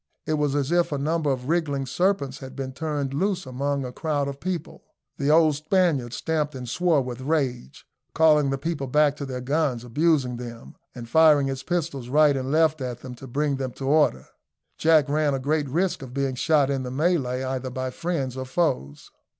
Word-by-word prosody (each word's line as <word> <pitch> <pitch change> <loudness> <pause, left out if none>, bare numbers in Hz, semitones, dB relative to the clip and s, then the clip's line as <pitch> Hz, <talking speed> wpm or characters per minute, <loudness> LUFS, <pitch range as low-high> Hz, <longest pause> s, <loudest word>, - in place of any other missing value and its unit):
It 155 - -1
was 150 -2 0
as 145 +1 0
if 175 -1 +2
a 145 - -1
number 155 +2 0
of 130 -2 -2
wriggling 145 -4 0
serpents 145 -2 0
had 130 -1 -9
been 130 -1 -5
turned 145 -2 -3
loose 185 +4 -1
among 135 +2 -2
a 125 - -5
crowd 145 +1 -1
of 140 0 -6
people. 175 -2 -4 0.4
The 140 0 0
old 155 0 +5
Spaniard 155 -5 +1
stamped 150 +1 -2
and 125 -1 -6
swore 160 +2 +2
with 125 0 -6
rage, 130 - -2 0.3
calling 150 -3 +4
the 135 - -1
people 145 -1 -3
back 150 +2 +3
to 140 - -5
their 130 -1 -5
guns, 135 -2 0
abusing 130 -1 +1
them, 120 -1 -9 0.2
and 120 -2 -8
firing 150 +1 +5
his 135 -1 -3
pistols 145 -6 -3
right 150 +1 +4
and 130 0 -3
left 155 -1 +3
at 125 -2 -4
them 130 - -8
to 130 +2 -11
bring 140 +2 -1
them 130 -2 -4
to 135 - -6
order. 145 - +3 0.5
Jack 155 -3 +4
ran 145 -1 +1
a - - -2
great 145 +1 0
risk 175 +5 0
of 130 -1 -9
being 135 -1 0
shot 140 +1 +2
in 135 -1 -1
the 125 - -4
melee, 130 -3 0
either 130 0 -3
by 130 0 -4
friends 140 -6 -3
or 130 0 -4
foes. 130 - -2
140 Hz, 200 wpm, -25 LUFS, 130-155 Hz, 0.5 s, old